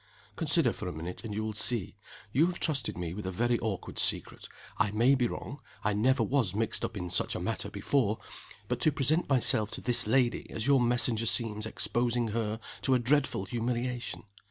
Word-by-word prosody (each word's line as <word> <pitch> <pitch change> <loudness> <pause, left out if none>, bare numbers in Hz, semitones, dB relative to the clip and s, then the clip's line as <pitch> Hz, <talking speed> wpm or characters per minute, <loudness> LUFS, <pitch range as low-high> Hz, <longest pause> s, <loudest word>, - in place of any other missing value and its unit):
"Consider 150 -4 +2
for - - -7
a - - -3
minute, 85 +6 -7
and 115 - -6
you 105 +1 -3
will 110 0 -3
see. 105 -1 +1 0.4
You 150 +9 +3
have 180 -1 -4
trusted 135 - -1
me 85 -2 -4
with 100 0 -6
a - - -2
very 120 +5 0
awkward 105 -4 -4
secret. - - +2 0.3
I 100 +1 +2
may 115 +6 +3
be 125 -3 +2
wrong 140 +4 -7 0.2
I 105 - +1
never 125 +6 +2
was 125 -9 0
mixed 110 +1 -1
up 115 -2 -4
in 90 -2 -4
such - - +1
a - - -3
matter - - -2
before 110 -7 0 0.5
but - - -2
to 155 - +4
present 145 +5 +1
myself 115 -5 +3
to - - -5
this 120 -3 +6
lady 120 0 +1
as 110 0 -3
your 135 -1 +4
messenger 120 -1 +1
seems 110 -2 +1
exposing 120 +1 0
her 110 0 -2 0.2
to 130 - +2
a - - +5
dreadful 130 -4 +1
humiliation. 120 +2 -3
120 Hz, 200 wpm, -29 LUFS, 105-130 Hz, 0.5 s, this